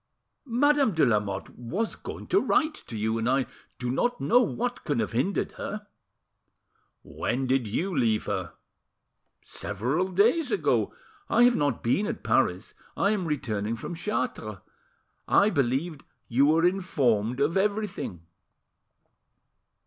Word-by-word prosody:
"Madame 275 0 +3
de 160 - +4
Lamotte 105 -4 -1
was 180 - -3
going - - -8
to - - +3
write 310 0 +2
to 115 - -9
you, 110 +2 0
and 115 +2 0
I 135 0 +2 0.3
do 125 0 -2
not 245 - 0
know 245 +2 +4
what 245 +1 -2
can 145 - -1
have - - -1
hindered 130 - 0
her." 210 0 -5 1.2
"When 130 +2 -2
did 130 -2 +1
you 175 - -2
leave 115 -5 +1
her?" - - -3 0.9
"Several 125 - -2
days 225 - +3
ago. 415 - +1 0.4
I 240 - +5
have 245 0 +5
not 145 -5 0
been 185 - +1
at - - -5
Paris; - - +1 0.2
I 200 - +2
am 195 -5 -1
returning 115 -7 -2
from 145 - -6
Chartres. 130 - -3 0.7
I 205 +1 +4
believed 140 +2 -1 0.2
you 135 +4 +3
were 160 +3 +4
informed 130 - +1
of 145 +4 +1
everything." 200 - -1
145 Hz, 135 wpm, -27 LUFS, -, 1.2 s, I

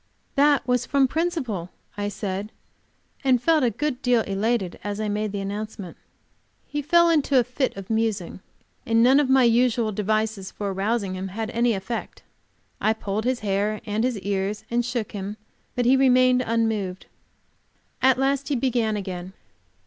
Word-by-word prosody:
"That 285 -2 +3
was 250 -1 +1
from 275 -1 +3
principle," 260 - -2 0.3
I 205 0 -2
said, 200 +1 -4 0.7
and 260 -2 +4
felt 315 +3 +3
a 245 - +4
good 255 +3 -3
deal 245 -2 +3
elated 200 -1 -1
as 205 0 -4
I 215 - -1
made 210 0 -1
the 200 -1 -3
announcement. 200 -2 -5 0.7
"He 295 - -3
fell 340 +4 +4
into 295 -4 +3
a - - +3
fit 250 -1 -2
of 195 +2 -7
musing, 220 -6 -1 0.4
and 230 0 +3
none 260 +3 +6
of 285 -3 +1
my 265 -1 +5
usual 235 -1 +3
devices 215 -1 -1
for 200 0 -4
arousing 200 0 -1
him 185 +1 -4
had 220 +4 -4
any 235 0 +2
effect. 200 +4 -5 0.6
I 215 - +3
pulled 215 0 -3
his 255 0 0
hair 205 +1 0
and 215 +1 -1
his 250 -3 0
ears, 200 +2 -2
and 240 0 +2
shook 240 -3 -3
him, 200 +1 -5 0.4
but 245 - 0
he 255 +2 +5
remained 255 -1 +4
unmoved." 220 -5 -1 1.0
At 260 0 +5
last 275 +1 0
he 290 - 0
began 235 -4 0
again. 185 -2 -6
225 Hz, 165 wpm, -24 LUFS, 205-255 Hz, 1.0 s, none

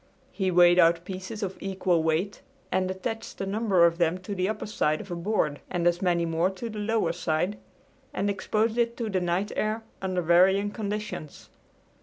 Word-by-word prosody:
He 190 -2 -1
weighed 175 0 +6
out 170 0 +4
pieces 190 +4 -6
of 190 -1 -3
equal 190 -3 0
weight 160 +6 -1 0.3
and 185 0 +1
attached 190 +4 -5
a - - -2
number 195 -3 +3
of 170 0 +1
them 170 +1 +2
to 200 +2 -5
the 185 0 0
upper 215 0 -3
side 155 -7 0
of 200 -3 -9
a - - -2
board 170 -5 -1
and 175 -2 -1
as 175 0 +2
many 175 -2 +2
more 165 +2 +1
to 220 +4 -6
the 210 - -6
lower 210 -5 +1
side, 175 +4 -1 0.5
and 200 - -1
exposed 215 +3 0
it 235 0 +1
to 225 -3 -3
the 185 -1 0
night 180 +4 -1
air 215 +1 -1 0.2
under 185 -2 -1
varying 190 +4 +4
conditions. 210 -8 -5
190 Hz, 190 wpm, -27 LUFS, 175-210 Hz, 0.5 s, weighed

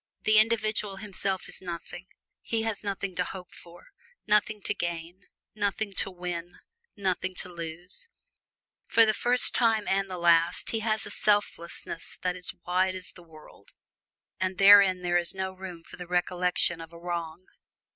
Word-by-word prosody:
The 215 0 +6
individual 215 -2 +1
himself 195 -1 -3
is - - -3
nothing; 175 0 -7 0.3
he 225 -1 -1
has 220 -2 -3
nothing 200 -2 -3
to 180 - +2
hope 180 -1 -9
for, 175 - -15 0.4
nothing 210 0 +2
to - - 0
gain, 170 0 -5 0.3
nothing 205 0 -2
to - - +1
win, 175 -1 -6 0.4
nothing 185 -1 -1
to 180 - -3
lose; 170 - -5 0.8
for 230 - +6
the 215 - +2
first 245 +3 +4
time 225 -3 +2
and 195 0 +1
the 185 - -5
last 170 0 +3
he 225 - 0
has 220 0 -1
a - - -2
selflessness 205 -5 -1
that 180 -1 0
is 180 -1 -4
wide 185 +1 +1
as 185 - -4
the 180 - -15
world, 155 -10 -16 0.6
and 185 0 -2
wherein 195 -2 +8
there 175 0 +2
is 175 +2 0
no 190 0 -2
room 185 -3 -9
for 185 - -12
the 180 -1 -8
recollection 180 -1 +1
of 165 0 -10
a 170 - -12
wrong. 170 0 -5
185 Hz, 165 wpm, -28 LUFS, 175-205 Hz, 0.8 s, wherein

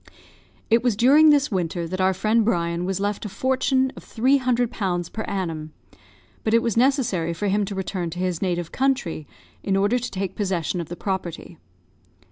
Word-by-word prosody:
It 230 +1 +5
was 245 -4 +1
during 280 +8 +6
this 290 -2 +3
winter 175 -2 -2
that 185 +2 -3
our 190 0 +2
friend 215 +4 +2
Brian 170 -5 0
was 190 0 -2
left 205 +1 -2
a 210 - -4
fortune 260 +4 +1
of - - -11
three 260 +5 +2
hundred 245 -2 0
pounds 175 -4 -2
per 220 - -5
annum; 160 -5 -4 0.7
but 220 +1 +2
it 230 - +3
was 230 -4 0
necessary 230 - +1
for 205 +4 -1
him 205 +1 +1
to 200 - -5
return 185 -2 -3
to 170 - -8
his 180 -2 -2
native 175 -3 -2
country, 260 - -1 0.3
in 195 - 0
order 205 +5 +2
to 245 - -4
take 195 -1 -4
possession 185 -3 -1
of 165 - -8
the 175 - -5
property. 175 -3 -5
195 Hz, 190 wpm, -23 LUFS, 175-235 Hz, 0.7 s, during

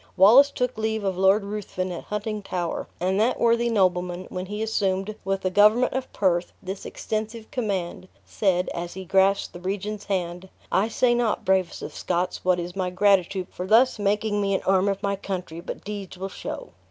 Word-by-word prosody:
Wallace 240 +9 +8
took 250 -4 -2
leave 220 -1 -1
of 190 -2 0
Lord 195 +3 +4
Ruthven 200 -3 -4
at 175 - -6
Huntingtower, 205 -5 -3
and 190 +2 +1
that 230 +4 +2
worthy 235 0 +3
nobleman, 180 -3 +1
when 185 0 -4
he 210 +2 -3
assumed, 195 -2 0
with 195 0 -1
the 185 - -1
government 210 +6 +5
of 260 0 -3
Perth, 180 -3 0
this 190 0 -6
extensive 220 +1 -4
command, 195 -9 -3 0.2
said, 185 -3 +1
as 170 0 -5
he 190 0 -7
grasped 195 +2 +2
the 175 - -8
regent's 200 +3 -4
hand, 180 -1 -3 0.2
"I 195 +3 +3
say 240 +2 +2
not, 240 -3 0
bravest 190 -2 +1
of - - -6
Scots, 180 0 -2
what 180 -1 +2
is 175 +1 -5
my 185 -2 -1
gratitude 185 -1 +2
for 180 - -5
thus 230 +3 +4
making 205 +1 +1
me 195 -1 +1
an - - -2
arm 190 0 +3
of 195 +1 -3
my 200 0 +1
country, 180 -4 -5
but 170 - -7
deeds 200 -3 -6
will 190 +1 -4
show!" - - -7
195 Hz, 190 wpm, -25 LUFS, 185-215 Hz, 0.2 s, Wallace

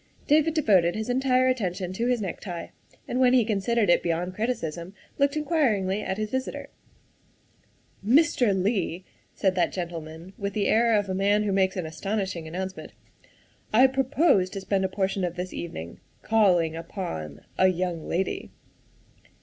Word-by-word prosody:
' - - -36
' - - -30
David 310 +1 +2
devoted 190 - +3
his 220 +3 -2
entire 255 0 +2
attention 185 -7 -1
to 230 +5 -1
his 245 -3 +1
necktie, 175 -2 -6 0.4
and 250 - -2
when 255 -1 +5
he 250 -3 +4
considered 215 +1 +1
it 175 - +4
beyond 175 +2 -2
criticism 185 -5 -3 0.2
looked 280 +2 +2
in 305 - -1
quiringly 215 - +1
at 190 - -3
his 215 0 -3
visitor. 260 0 -4 0.7
" - - -37 0.2
Mr. 280 -8 +2
Leigh," 185 -3 -1 0.3
said 190 -2 +1
that 185 - +1
gentleman 170 0 -6
with 200 -1 -3
the 205 -1 0
air 230 0 +3
of 205 -1 -1
a 190 - -2
man 200 +2 +2
who 205 - 0
makes 190 0 +1
an 180 - -2
astonishing 190 0 -3
announcement, 185 +3 -6 0.4
" - - -32 0.3
I 245 +4 +7
pro 265 0 +2
pose 275 - +3
to 195 +1 -6
spend 190 0 0
a - - -1
portion 190 0 -1
of 175 -1 -2
this 180 +1 -5
evening 85 - -7 0.2
calling 180 -7 +3
upon 120 - -6 0.2
a 185 - +6
young 180 -3 -2
lady." 185 +3 -2
195 Hz, 175 wpm, -26 LUFS, 180-230 Hz, 0.7 s, I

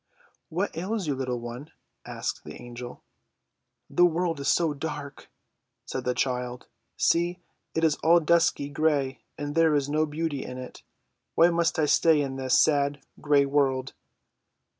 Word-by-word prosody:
"What 180 +3 -2
ails 190 +4 -2
you, 145 - 0
little 130 -2 -3
one?" 120 +5 -8 0.4
asked - - -4
the - - -10
Angel. 120 0 -9 0.8
"The 175 - +2
world 170 -2 +1
is 140 - -3
so 165 -3 +2
dark!" 145 -1 -6 0.6
said - - -5
the 125 0 0
child. 125 -1 -2 0.3
"See, 175 +1 +2 0.4
it 160 - 0
is 155 -2 +3
all 170 +2 +5
dusky 165 -3 +2
gray, 145 -4 0 0.2
and 145 0 -4
there 160 -1 +4
is 145 -1 0
no 155 +1 +1
beauty 150 -2 -3
in 125 - -7
it. 130 0 -9 0.5
Why 170 +1 +6
must 170 -1 +1
I 155 - +3
stay 160 +1 +4
in 135 -2 -2
this 130 -1 +2
sad, 145 -1 +2 0.2
gray 145 -2 +4
world?" 135 -2 0
145 Hz, 155 wpm, -27 LUFS, 135-165 Hz, 0.8 s, Why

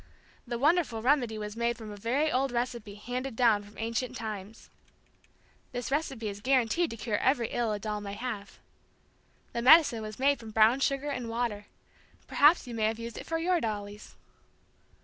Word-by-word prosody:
The 240 - -2
wonderful 285 -5 +2
remedy 245 -4 +2
was 210 0 -5
made 235 0 0
from 220 -2 -8
a - - -7
very 255 +9 0
old 265 +1 +1
recipe 235 -4 -3
handed 245 +4 -5
down 225 -4 +4
from 205 +1 -16
ancient 230 +2 -2
times. 215 -1 -7 1.0
This 245 +1 -4
recipe 270 -6 -1
is 205 0 -6
guaranteed 265 +6 +2
to 230 - -7
cure 210 -1 -1
every 250 -4 +2
ill 235 -2 -1
a 210 - -1
doll 210 0 -4
may 200 -1 -6
have. 210 -5 -6 1.0
The 235 - -1
medicine 265 -3 +6
was 215 0 -7
made 280 +1 +2
from 225 -1 -9
brown 220 +4 +4
sugar 275 +1 0
and 250 -4 -4
water. 230 -3 -2 0.6
Perhaps 300 +3 +4
you 245 - -7
may 220 -2 0
have 220 +1 0
used 230 0 -7
it - - -10
for 325 - -1
your 345 +1 +1
dollies. 205 -1 -5
235 Hz, 180 wpm, -29 LUFS, 215-265 Hz, 1.0 s, medicine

